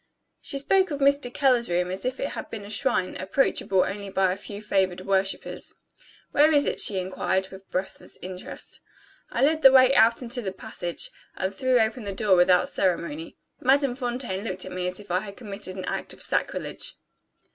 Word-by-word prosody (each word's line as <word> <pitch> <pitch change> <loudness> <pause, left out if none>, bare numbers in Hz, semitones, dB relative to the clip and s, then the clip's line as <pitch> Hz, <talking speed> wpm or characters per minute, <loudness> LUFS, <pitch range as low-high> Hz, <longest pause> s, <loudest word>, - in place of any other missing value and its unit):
She 275 - -4
spoke 380 +7 +3
of 290 - -2
"Mr. 280 -2 +2
Keller's 250 -5 +2
room" 180 +1 0
as 190 +4 -4
if 255 +1 -2
it 275 - -1
had - - -6
been 210 -3 -7
a 205 - -8
shrine, 205 -4 +1
approachable 190 -2 +2
only 200 0 -4
by 190 -1 +2
a - - -1
few 200 +1 -8
favored 190 -3 0
worshippers. 195 0 -1 0.6
"Where 300 +2 +5
is 290 -2 +4
it?" - - -1
she 200 - +2
inquired, 190 +1 -1
with 190 0 -13
breathless 185 +1 -5
interest. 185 0 -8 0.5
I 240 - 0
led 310 +2 +3
the 270 - +9
way 260 0 +7
out 235 0 +5
into 245 +1 -1
the 190 -4 -4
passage, 175 -2 -5 0.3
and 190 +1 -2
threw 255 +4 +2
open 225 +2 0
the 200 - -3
door 195 -1 +3
without 180 0 +5
ceremony. 170 -4 -2 0.2
Madame 270 -1 +3
Fontaine 245 -6 -3
looked 185 -5 -3
at - - -8
me 180 0 -2
as 180 +1 -3
if 205 -3 -10
I 180 - +3
had 200 0 -9
committed 200 -4 -7
an 185 -1 -5
act - - -4
of - - -11
sacrilege. - - -2
200 Hz, 195 wpm, -26 LUFS, 185-255 Hz, 0.6 s, the